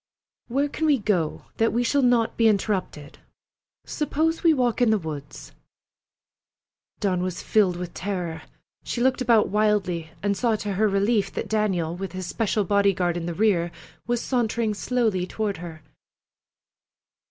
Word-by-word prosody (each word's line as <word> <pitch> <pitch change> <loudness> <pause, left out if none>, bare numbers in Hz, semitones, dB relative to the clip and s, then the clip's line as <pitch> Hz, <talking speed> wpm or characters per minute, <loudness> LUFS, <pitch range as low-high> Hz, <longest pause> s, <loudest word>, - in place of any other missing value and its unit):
"Where 275 +4 +1
can 315 +2 -2
we 290 -2 +4
go 190 -8 -1
that 225 0 +2
we 240 +1 +1
shall 280 +4 +2
not 245 -3 +2
be 230 - +4
interrupted? 195 -8 -1 0.7
Suppose 315 +2 -1
we 335 - +5
walk 250 -5 +1
in 240 - +5
the 220 - +4
woods?" 145 - -7 1.5
Dawn 185 -3 0
was 180 -1 -3
filled 200 -5 +3
with 180 -1 -6
terror. 180 -4 -4 0.4
She - - -4
looked 260 +1 +2
about 230 -3 +4
wildly, 200 -6 +1
and 200 -1 +1
saw 230 +1 +1
to 205 -1 -3
her 215 +3 +2
relief 200 +1 +1
that - - -4
Daniel, 190 -6 0
with 190 +1 -6
his 185 0 -5
special 215 +2 0
bodyguard 195 -3 +2
in 170 -1 -3
the 170 - -3
rear, 185 -5 +2 0.4
was 240 -1 0
sauntering 235 -3 0
slowly 215 -5 0
toward 210 -3 -2
her. 165 -2 -9
205 Hz, 155 wpm, -24 LUFS, 180-235 Hz, 1.5 s, we